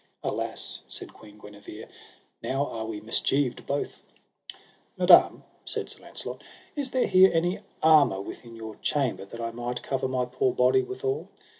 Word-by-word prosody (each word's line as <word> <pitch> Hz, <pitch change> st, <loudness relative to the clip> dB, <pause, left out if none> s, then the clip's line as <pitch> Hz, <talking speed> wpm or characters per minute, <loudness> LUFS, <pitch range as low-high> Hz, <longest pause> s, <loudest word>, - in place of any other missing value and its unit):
Alas -, -, -3 dB
said -, -, -7 dB
Queen 105 Hz, -1 st, -15 dB
Guenever, 105 Hz, +1 st, -11 dB, 0.5 s
now 135 Hz, +2 st, 0 dB
are 110 Hz, -5 st, -5 dB
we 110 Hz, -2 st, -5 dB
mischieved 125 Hz, +4 st, 0 dB
both 140 Hz, +1 st, -3 dB, 1.0 s
Madam, -, -, +6 dB, 0.2 s
said -, -, -4 dB
Sir -, -, -9 dB
Launcelot, -, -, -7 dB, 0.3 s
is 285 Hz, -3 st, 0 dB
there 255 Hz, 0 st, +1 dB
here 185 Hz, +1 st, +7 dB
any 175 Hz, +4 st, +1 dB, 0.2 s
armour 155 Hz, -11 st, +6 dB
within 115 Hz, +4 st, -9 dB
your 110 Hz, -1 st, -8 dB
chamber, 135 Hz, -9 st, -1 dB
that 115 Hz, +4 st, -10 dB
I 115 Hz, 0 st, -3 dB
might 120 Hz, +1 st, -4 dB
cover 130 Hz, -1 st, -1 dB
my 130 Hz, -1 st, 0 dB
poor 390 Hz, -, 0 dB
body 395 Hz, -1 st, +4 dB
withal? 405 Hz, +2 st, -3 dB
130 Hz, 150 wpm, -27 LUFS, 110-180 Hz, 1.0 s, here